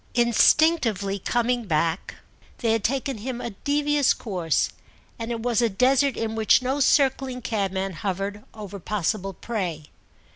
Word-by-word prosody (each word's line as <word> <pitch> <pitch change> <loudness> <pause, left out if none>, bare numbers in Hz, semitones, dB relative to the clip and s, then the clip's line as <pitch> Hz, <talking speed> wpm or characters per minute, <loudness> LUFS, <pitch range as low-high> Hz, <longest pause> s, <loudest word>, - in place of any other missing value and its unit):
Instinctively, 235 - +3
coming 240 +3 0
back, 165 0 -1 0.4
they 230 -3 0
had 225 -2 0
taken 265 0 -1
him 245 +2 -5
a 235 - -5
devious 290 +5 +1
course, 180 -8 -1 0.5
and 230 0 -4
it 230 -1 -3
was 240 -1 +1
a 235 - +2
desert 265 +6 +2
in 225 -1 -2
which 220 +3 +3
no 265 +3 -1
circling 265 -2 +2
cabman 195 -3 -2
hovered 200 +2 -4
over 205 -2 -8
possible 195 +1 -2
prey. 175 -10 -4
225 Hz, 140 wpm, -24 LUFS, 195-255 Hz, 0.5 s, Instinctively